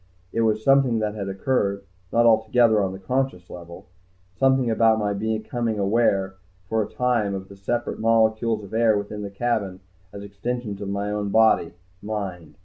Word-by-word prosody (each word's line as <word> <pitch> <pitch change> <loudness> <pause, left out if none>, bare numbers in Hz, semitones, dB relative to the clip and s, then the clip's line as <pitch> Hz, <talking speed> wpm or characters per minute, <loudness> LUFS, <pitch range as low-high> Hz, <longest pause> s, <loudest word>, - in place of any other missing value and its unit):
It 115 - 0
was 110 -1 +1
something 135 -3 +4
that 105 -1 -1
had 100 -2 -5
occurred 100 -1 -1 0.3
not 120 0 +3
altogether 110 0 +4
on 95 -1 -1
the 95 - -7
conscious 125 -3 -2
level. 85 -1 -10 0.5
Something 130 +1 +2
about 110 0 +3
my 105 -1 -1
becoming 110 +2 -2
aware, 100 -2 +1 0.3
for 110 +3 0
a 105 - -4
time, 120 -6 0
of 95 0 -7
the 100 - -12
separate 120 +5 -3
molecules 110 -1 +2
of 100 - -11
air 110 -2 +3
within 105 +1 -5
the 100 - -5
cabin 100 -3 -2 0.3
as 100 - -9
extensions 105 +1 -5
of 100 - -4
my 100 +1 -2
own 105 -1 -2
body 110 -6 +3 0.3
mind. 95 -6 -5
110 Hz, 170 wpm, -23 LUFS, 100-115 Hz, 0.5 s, something